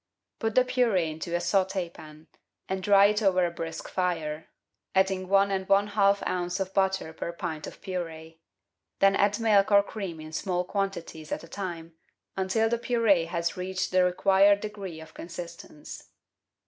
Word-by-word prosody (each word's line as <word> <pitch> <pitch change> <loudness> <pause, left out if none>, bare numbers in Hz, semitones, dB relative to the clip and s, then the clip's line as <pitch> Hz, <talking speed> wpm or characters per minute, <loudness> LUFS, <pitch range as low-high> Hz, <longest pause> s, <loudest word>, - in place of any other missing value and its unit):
Put 225 -1 -2
the 255 - +5
purde 245 -6 +2
into 165 +2 -4
a - - +1
sautdpan, 175 -4 -2 0.4
and 190 0 -2
dry 200 0 +6
it 210 +1 +2
over 185 -3 +3
a 170 - -2
brisk 165 -1 -6
fire, 160 -4 -2 0.5
adding 190 -1 +2
one 195 +1 +3
and 190 -1 -2
one 200 +1 +4
half 200 -1 +3
oz. 180 0 -2
of 190 0 -3
butter 190 -4 0
per 170 - -5
pint 160 -3 -5
of - - -11
purde; 165 -3 -6 0.6
then 195 0 +4
add 205 +2 +2
milk 210 -3 +3
or 200 0 +6
cream 195 -6 -6
in 155 0 -9
small 180 +2 -1
quantities 180 -5 -4
at - - -3
a - - -11
time, 170 -3 -6 0.4
until 195 +4 +1
the 235 +1 0
purde 230 -8 +2
has 170 0 -2
reached 185 +1 -3
the 185 0 +4
required 195 +2 +4
degree 200 -6 -6
of 160 0 -12
consistence. 170 -3 -9
190 Hz, 165 wpm, -27 LUFS, 170-200 Hz, 0.6 s, dry